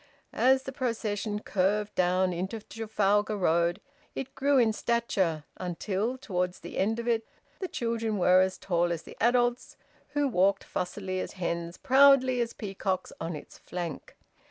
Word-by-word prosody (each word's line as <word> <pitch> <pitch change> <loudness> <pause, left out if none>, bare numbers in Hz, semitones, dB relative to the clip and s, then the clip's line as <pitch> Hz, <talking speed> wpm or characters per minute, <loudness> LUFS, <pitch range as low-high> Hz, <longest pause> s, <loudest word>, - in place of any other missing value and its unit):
As 260 +1 +4
the 270 - -5
procession 215 -5 -2
curved 205 +2 0
down 185 0 +2
into 190 +6 -3
Trafalgar 210 -1 0
Road, 170 0 +2 0.4
it 270 0 -5
grew 280 +1 +2
in 230 -3 +4
stature, 195 -10 0
until, 195 +7 -2
towards 180 -7 -2
the - - -6
end 220 +4 +1
of 235 0 -4
it, 230 -1 +2 0.4
the 375 - -3
children 230 - -2
were 185 0 +5
as 190 0 0
tall 175 -1 0
as 165 -2 -3
the - - -12
adults 240 +1 +2 0.4
who 290 -1 +2
walked 195 -4 +2
fussily 185 +1 -3
as - - -4
hens, 170 -2 -3
proudly 265 -2 +5
as 235 0 -1
peacocks, 195 -3 -3
on 165 0 -3
its 150 - -11
flank. 175 -4 -6
205 Hz, 155 wpm, -29 LUFS, 180-235 Hz, 0.4 s, were